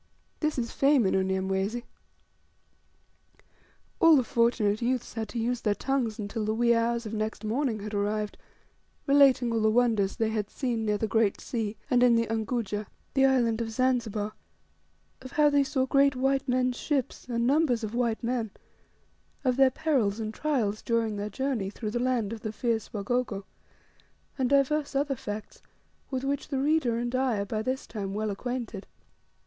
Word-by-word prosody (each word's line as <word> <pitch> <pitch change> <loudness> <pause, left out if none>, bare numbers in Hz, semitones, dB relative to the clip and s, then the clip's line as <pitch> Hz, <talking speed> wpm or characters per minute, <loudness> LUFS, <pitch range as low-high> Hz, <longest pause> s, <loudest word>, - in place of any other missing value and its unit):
This 305 -2 -1
is 235 -2 -2
fame 275 -4 +3
in 190 - +2
Unyamwezi! 190 +4 0 2.2
All 330 -1 +7
the 265 - +4
fortunate 230 -2 +1
youths 245 0 -1
had 220 -2 -4
to - - -6
use 235 +1 -1
their 210 -2 +1
tongues 255 -5 -1
until 215 +1 -4
the 215 +1 -1
wee 235 +1 +3
hours 235 0 0
of 215 - -6
next 215 0 -3
morning 230 -1 -1
had 210 +1 -6
arrived, 210 +1 -1 0.7
relating 275 -4 +5
all 225 - +1
the 215 - +4
wonders 220 -4 +2
they 225 -1 0
had 210 -2 -2
seen 235 -5 -2
near 210 -1 +1
the 220 - -1
Great 220 -2 +1
Sea, 220 -3 -3
and 245 -1 +3
in 245 -1 +6
the 230 0 +2
"Unguja," 220 -2 -2 0.3
the 270 0 +5
island 235 -4 +2
of 225 - -2
Zanzibar; 225 -3 0 0.9
of 260 0 -10
how 295 -1 +4
they 285 -1 +4
saw 265 -1 0
great 275 +1 +3
white 270 +1 +1
men's 250 0 +1
ships, 280 -5 -2
and 235 -1 0
numbers 265 -4 +2
of 215 0 -4
white 235 -1 0
men, 235 -2 -1 1.0
of 255 -1 +3
their 270 0 +5
perils 255 -8 0
and 215 -1 -3
trials 225 -8 -1
during 230 -2 0
their 205 +1 -3
journey 240 -3 -2
through 210 +1 -5
the 240 - -1
land 240 -4 0
of 225 - -7
the 215 - -3
fierce 225 0 -2
Wagogo, 210 -1 -2 0.9
and 260 -3 0
divers 280 +1 +2
other 275 0 +1
facts, 210 -3 -7 0.5
with 260 -1 -3
which 280 0 -2
the 275 - -2
reader 275 -4 +2
and 240 +1 -2
I 255 -3 +1
are - - -2
by 215 +1 -2
this 255 +3 -2
time 200 -3 -5
well 215 0 -1
acquainted. 230 -1 -5
235 Hz, 175 wpm, -28 LUFS, 215-260 Hz, 2.2 s, All